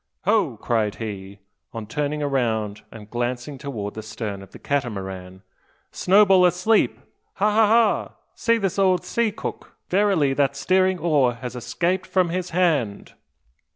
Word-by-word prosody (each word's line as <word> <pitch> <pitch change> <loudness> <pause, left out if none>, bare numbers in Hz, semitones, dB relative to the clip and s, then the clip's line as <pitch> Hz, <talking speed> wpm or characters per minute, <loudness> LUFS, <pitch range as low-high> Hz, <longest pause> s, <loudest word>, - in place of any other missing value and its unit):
"Ho!" 195 - +2
cried 110 -2 -1
he, 100 -3 -7 0.4
on 115 -2 -6
turning 150 +6 -2
round 110 -7 -1
and 105 -2 -12
glancing 120 +3 -3
towards 115 -8 -5
the 110 - -6
stern 105 -2 -6
of 95 - -13
the - - -11
Catamaran, 95 -8 -4 0.5
"Snowball 195 -1 +5
asleep! 180 +5 +2 0.4
Ha! 210 - +2
ha! 215 0 +4
ha! 225 0 +2 0.2
See 230 0 +1
the 195 -5 -1
old 185 -2 +2
sea 225 +4 0
cook! - - -7
Verily, 185 -8 +2
that 140 0 +1
steering 185 +6 +2
oar 145 -7 +2
has 125 +1 -7
escaped 170 +10 -1
from 185 -2 +1
his 180 +1 -3
hand!" 160 - 0
140 Hz, 145 wpm, -23 LUFS, 110-185 Hz, 0.5 s, Snowball